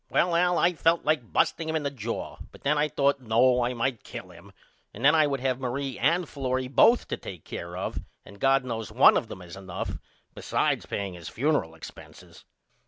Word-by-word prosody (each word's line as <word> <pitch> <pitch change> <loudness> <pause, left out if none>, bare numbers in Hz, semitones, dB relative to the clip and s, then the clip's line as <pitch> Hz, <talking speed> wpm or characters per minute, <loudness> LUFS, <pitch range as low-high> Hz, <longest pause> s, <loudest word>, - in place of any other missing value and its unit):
Well 175 -1 +2
Al 175 0 +3
I 175 +1 +3
felt 165 +1 +1
like 150 -7 0
busting 160 -1 +1
him 160 - -1
in 155 - -1
the 140 - -2
jaw 115 -3 -5
but - - -17
then 145 +2 +2
I 150 +1 +2
thought 140 -1 +1
No 125 +1 +3
I 125 +1 -1
might 120 0 -2
kill - - -9
him - - -15 0.4
and 120 +6 -4
then 150 - +7
I 155 -2 +4
would 135 -2 -2
have 130 -1 0
Marie 130 +1 -3
and 170 +5 +2
Florrie 130 -2 -2
both 230 - +4
to - - -2
take 90 -5 -9
care 85 +1 -7
of 95 - -3 0.3
and 100 - -14
God 135 +1 +3
knows 115 -4 -4
one - - +6
of - - 0
them 90 - -9
is 85 -1 -10
enough 95 -1 -6 0.3
besides - - -1
paying 100 -2 -3
his 85 -2 -9
funeral 135 - 0
expenses. 80 - -13
130 Hz, 210 wpm, -27 LUFS, 115-150 Hz, 0.4 s, then